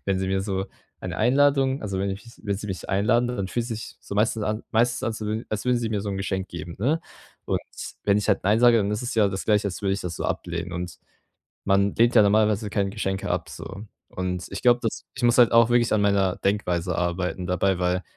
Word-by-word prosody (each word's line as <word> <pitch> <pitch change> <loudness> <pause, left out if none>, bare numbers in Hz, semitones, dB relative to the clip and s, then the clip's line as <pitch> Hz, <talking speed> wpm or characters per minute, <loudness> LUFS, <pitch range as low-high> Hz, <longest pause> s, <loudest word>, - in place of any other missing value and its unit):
wenn 100 -1 +1
sie 95 - -1
mir 95 0 0
so 95 -1 -2 0.3
eine - - -5
Einladung 135 +2 +3
also, 100 -3 -3
wenn 100 0 -1
ich 95 +5 -6
mich 115 - -14
wenn 100 -2 -1
sie 105 - -6
mich 95 -4 -5
einladen, 110 +5 +2
dann 100 -6 -3
fühlt 120 +2 -2
sich 115 -2 -6
so - - -8
meistens 110 +1 +1
an 105 +1 -2
meistens 120 +1 +2
an 115 - 0
zu 110 +1 -3
als 105 -1 -2
würden 125 -1 +3
sie 115 -1 -2
mir 105 -2 -1
so 100 - -3
'n 95 - -3
Geschenk 95 -1 -2
geben, 85 0 -7
ne? 145 - +1 0.5
Und - - 0 0.4
wenn 100 0 +3
ich 105 - -3
halt - - +2
„Nein“ 105 +4 +3
sage, 120 -1 +6
dann 100 -1 0
ist 105 - -2
es 125 - -3
ja 105 -3 +4
das 95 -1 -4
Gleiche, 105 -1 +2
als 95 - -6
würde 100 -1 +1
ich 100 - -4
das 90 -1 -5
so - - -4
ablehnen. 85 0 -3
Und 90 0 -5 0.7
man 100 0 +3
lehnt 120 +1 +3
ja 110 - +8
normalerweise 105 +1 +2
keine 100 -1 0
Geschenke 95 -3 -3
ab, 80 -2 -2
so. 95 - -8 0.2
Und 90 -1 -3
ich 100 - -6
glaube, 120 0 +5
dass 115 - -3
ich 125 - -6
muss 120 0 +4
halt 120 - +7
auch 115 0 +6
wirklich 120 -1 +3
an 105 - +3
meiner 100 -2 +2
Denkweise 90 -3 0
arbeiten 90 +1 -1
dabei, 90 +1 +1
weil 90 +1 0
100 Hz, 245 wpm, -25 LUFS, 95-115 Hz, 0.7 s, ja